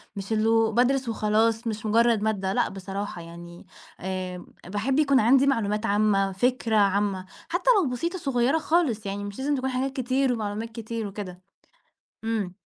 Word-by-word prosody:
مش 200 +2 -4
إنه 225 +1 +3
بادرس 250 +2 +2
وخلاص 225 +1 +1
مش 220 -1 -4
مجرد 230 0 +3
مادة 200 -3 -1
لأ - - +1
بصراحة 195 -1 -6
يعني، 170 +1 -11 0.3
آآ 185 -1 -5 0.2
باحب 220 +9 0
يكون 280 -3 +4
عندي 260 +5 +5
معلومات 215 -5 0
عامة 200 -2 +2
فكرة 245 +3 0
عامة 200 -2 +1 0.2
حتى 350 +8 0
لو 300 - 0
بسيطة 335 +9 -2
صغيرة 270 -2 +1
خالص 305 -10 +1
يعني 200 +1 -4
مش 205 +2 -7
لازم 285 +2 0
تكون 265 0 -2
حاجات 260 +1 -2
كتير 260 0 +1
ومعلومات 215 0 -3
كتير 225 -1 -5
وكده 190 -3 -7 0.8
إمم. 215 -5 -2
220 Hz, 155 wpm, -26 LUFS, 200-255 Hz, 0.8 s, عندي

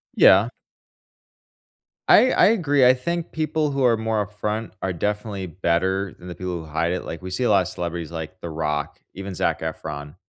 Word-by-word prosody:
Yeah. - - +6 1.6
I 255 - +7
I - - +5
agree, 145 - +3
I 125 - +7
think 170 +6 -3
people 155 -1 -1
who 135 -1 -1
are 115 -2 +4
more 110 -2 0
upfront 105 +2 -4
are 95 -1 -1
definitely 105 +1 -3
better 95 +3 -1
than 90 - -11
the 90 - -7
people 90 -1 -4
who 80 - -9
hide 80 +2 -1
it, 90 - -3
like, 85 - -7
we 95 - -7
see 95 - -1
a 120 - +2
lot 100 -2 +5
of - - -6
celebrities 85 -2 -5
like 80 +3 -7
The 85 - -5
Rock, 75 -2 -3 0.2
even 95 0 -6
Zac - - -1
Efron, 75 -1 -6
95 Hz, 195 wpm, -23 LUFS, 85-115 Hz, 1.6 s, I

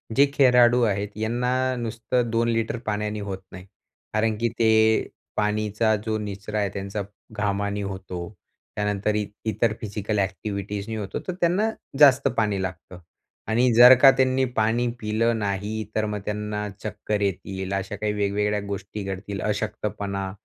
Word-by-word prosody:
जे 140 - +7
खेळाडू 125 -3 +5
आहेत 100 -2 0
यांना 125 +3 0
नुसतं 120 +1 -1
2 115 +1 +1
लिटर 115 +1 0
पाण्याने 105 0 -2
होत 100 -2 -4
नाही. 90 0 -10 0.5
कारण 110 0 +1
की 120 +2 0
ते 115 -1 +4 0.7
पाणीचा 105 +1 +1
जो 110 -1 0
निचरा 105 +1 -4
आहे 100 -1 0
त्यांचा, 100 +1 -4 0.3
घामाने 100 -1 -1
होतो, 95 -3 -5 0.5
त्यानंतर 105 0 0
इ 105 -1 0 0.2
इतर 110 0 +1
फिजिकल 105 0 -2
ॲक्टिव्हिटीजनी 100 +2 -3
होतो. 100 -3 -4
तर 185 - -1
त्यांना 180 +6 +2 0.3
जास्त 140 -3 +7
पाणी 105 -4 +1
लागतं 90 -1 -6 0.5
आणि 120 +3 +3
जर 120 +2 +10
का 135 - +10
त्यांनी 130 0 +3 0.2
पाणी 115 +3 +2
पिलं 110 +2 0
नाही, 105 +2 -2
तर 110 - +1
मग 105 -1 -3
त्यांना 105 0 -3 0.2
चक्कर 105 0 -3
येतील 95 0 -2
अशा 95 +1 -2
काही 105 +1 -2
वेगवेगळ्या 105 0 0
गोष्टी 100 +1 -5
घडतील. 95 +1 -5
अशक्तपणा 105 -2 -3
105 Hz, 145 wpm, -24 LUFS, 100-115 Hz, 0.7 s, जर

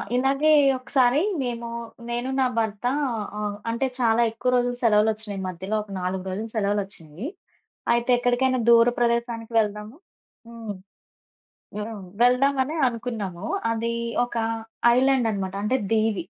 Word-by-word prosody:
ఇలాగే 275 +4 +2 0.3
ఒకసారి 255 +1 +2 0.2
మేము 235 -2 -3 0.4
నేను, 240 +2 -2
నా 260 - +4
భర్తా 220 +1 0 0.5
ఆహ్, 210 -1 -2 0.2
అంటే 235 +4 0
చాలా 230 -1 +3
ఎక్కువ 230 +3 -2
రోజులు 245 0 +1
సెలవులొచ్చినియి 215 -2 +2
మధ్యలో 185 +4 -4
ఒక 205 - -14
4 185 +1 -2
రోజులు 210 +4 -4
సెలవులొచ్చినియి. 200 - -3 0.7
అయితే 235 +1 0
ఎక్కడికైనా 245 +1 +1
దూర 235 0 +7
ప్రదేశానికి 235 -1 -1
వెళ్దాము 210 +2 -2 0.5
హ్మ్. 230 -3 -6 1.1
హ్మ్. 210 -2 -6 0.2
వెళ్దామనే 265 +4 +3
అనుకున్నాము. 220 -6 -5 0.3
అదీ 230 +1 -2 0.3
ఒక 245 - -8 0.6
ఐలాండ్ 260 -2 +3
అనమాట 190 -2 -3
అంటే 255 +5 +1
దివీ. 215 -5 +1
230 Hz, 115 wpm, -24 LUFS, 210-245 Hz, 1.1 s, దూర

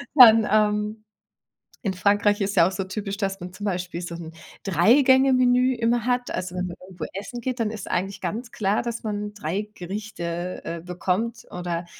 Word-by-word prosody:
dann, 225 -5 +9
ähm, 210 0 +1 0.8
in 195 -4 0
Frankreich 205 +2 +2
ist 200 +1 -1
ja 170 - +6
auch 190 - -2
so 195 +1 -3
typisch, 200 0 -4
dass 195 -2 -2
man 180 0 -8
zum 205 - -7
Beispiel 180 -3 -2
so 170 -1 -5
'n 165 -1 -8 0.3
3- 195 - +5
Gänge-Menü 255 -1 +4
immer 235 0 +1
hat. 245 0 0
Also 180 0 -4
wenn 180 0 -1
man 175 - -7
irgendwo 175 -4 -6
essen 200 +5 -6
geht, 255 0 -3
dann 225 - +1
ist 215 -3 -7
eigentlich 195 +2 -1
ganz 230 +7 -4
klar, 205 -1 0
dass 235 -1 -4
man 210 -1 -3
3 205 +3 -3
Gerichte, 180 -2 -5
äh, 170 0 -4
bekommt 185 +6 -2
oder 175 -1 -3
205 Hz, 185 wpm, -24 LUFS, 180-230 Hz, 0.8 s, dann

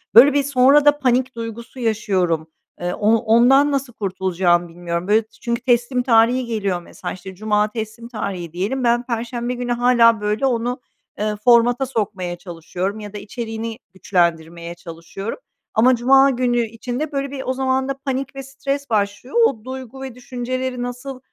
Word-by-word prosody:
Böyle 265 +5 +9
bir, 285 0 +2
sonra 280 +2 +4
da 290 0 +5
panik 255 -1 +1
duygusu 230 +2 -7
yaşıyorum. 190 -8 0 0.3
Eee, 175 0 -1
o 210 - -2
ondan 245 +6 +4
nasıl 270 -3 -2
kurtulacağımı 185 -3 0
bilmiyorum. 170 +1 -4
Böyle, 215 +2 +4
ç 220 - -23
çünkü 235 0 -2
teslim 245 0 +1
tarihi 245 +1 +4
geliyor 200 -6 -2
mesela, - - -7
işte, 190 +1 -10
cuma 210 +1 +1
teslim 220 +1 -6
tarihi 190 -8 -5
diyelim, 210 +9 -2
ben 240 0 +2
perşembe 240 +1 -3
günü 245 0 -3
hâlâ, 235 -2 +4
böyle, 210 +5 0
onu, 245 0 -1 0.4
eee, 210 0 -1
formata 245 +1 +4
sokmaya 200 -8 -3
çalışıyorum 180 +4 -5
ya 210 -1 -8
da - - -5
içeriğini 225 +2 -5 0.2
güçlendirmeye 170 -2 -1
çalışıyorum 175 +4 -7 0.4
ama 250 +4 +5
cuma 270 +3 +5
günü 245 -2 +1
içinde, 245 +6 -5
böyle 275 -1 -2
bir, 270 -2 -5
o 260 - 0
zaman 265 0 0
da 275 - -2
panik 270 0 -4
ve 270 - -6
stres 275 +1 -4
başlıyor. 205 - -1
O 225 - -1
duygu 260 0 -7
ve 265 -3 -7
düşünceleri 255 0 -4
nasıl, 250 +2 -6
235 Hz, 165 wpm, -20 LUFS, 205-255 Hz, 0.4 s, Böyle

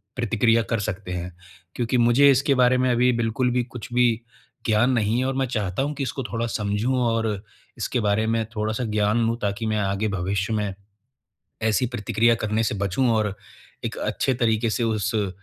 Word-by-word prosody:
प्रतिक्रिया 115 -1 +2
कर 115 - +1
सकते 100 -2 -4
हैं। 90 0 -4 0.4
क्योंकि 125 +1 0
मुझे 120 +4 +5
इसके 135 +1 +2
बारे 125 0 +4
में 130 0 +2
अभी 125 +1 +3
बिल्कुल 120 +2 0
भी 125 0 +1
कुछ 120 -2 -9
भी 125 0 +4 0.6
ज्ञान 115 +3 +3
नहीं 115 -1 +1
है 130 - 0
और 135 - 0
मैं 135 - +1
चाहता 105 -3 -2
हूँ 145 - -2
कि 140 - -3
इसको 135 0 -3
थोड़ा 115 0 -3
समझूँ 105 +4 -1
और 115 -1 0 0.5
इसके 125 - -1
बारे 105 +1 +1
में 115 0 +1
थोड़ा-सा 110 +3 -1
ज्ञान 105 +2 +1
लूँ, 115 - 0
ताकि 100 +2 -2
मैं 110 0 0
आगे 100 +1 0
भविष्य 95 +2 -1
में, 105 -2 -1 0.9
ऐसी 110 +2 +2
प्रतिक्रिया 115 0 +1
करने 110 0 -1
से 105 - -1
बचूँ 100 +6 0
और 105 -2 0 0.5
एक - - -4
अच्छे 130 - 0
तरीक़े 115 -2 +1
से 120 - 0
उस 110 0 -1
अ, 105 -2 +1
115 Hz, 190 wpm, -24 LUFS, 105-125 Hz, 0.9 s, मुझे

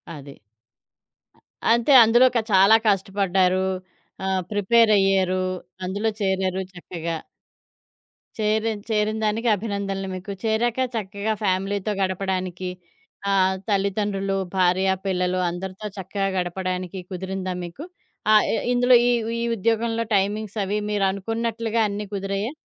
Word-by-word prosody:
అది. 140 -1 -10 1.3
అ - - -1
అంతే. 235 +4 +1
అందులో 235 +3 +5
క - - +4
చాలా 195 +3 +7
కష్టపడ్డారు. 190 -2 +2 0.6
ఆహ్, 190 -1 0
ప్రిపేరయ్యారు. 195 -3 +3 0.4
అందులో 200 +4 -1
చేరారు 190 -1 0
చక్కగా. 170 -2 -5 1.2
చేరిన్ 215 0 0
చేరినదానికి 215 +1 0
అభినందనలు 200 -2 -3
మీకు. 185 +2 -7
చేరాక 225 +2 +1 0.2
చక్కగా 205 0 -2
ఫ్యామిలీతో 195 +2 0
గడపడానికి, 185 -1 -2 0.6
ఆహ్, 190 -1 +3
తల్లిదండ్రులు, 195 -1 0 0.2
భార్యా 185 +1 +3
పిల్లలు 180 -1 0
అందరితో 190 +4 -6
చక్కగా 195 +1 -2
గడపడానికి 185 +1 -3
కుదిరిందా 190 0 -4
మీకు? 175 - -9 0.5
ఆహ్, 215 -1 +6
ఇ - - +2 0.2
ఇందులో 245 +1 +5
ఈ - - +4 0.3
ఈ - - -1
ఉద్యోగంలో 230 +2 0
టైమింగ్స్ 205 +2 -1
అవి 200 +2 -1
మీరు 205 -2 +1
అనుకున్నట్లుగా 225 +3 -2
అన్నీ 205 +1 -4
కుదిరయాా? 200 +3 -2
195 Hz, 110 wpm, -23 LUFS, 185-215 Hz, 1.3 s, చాలా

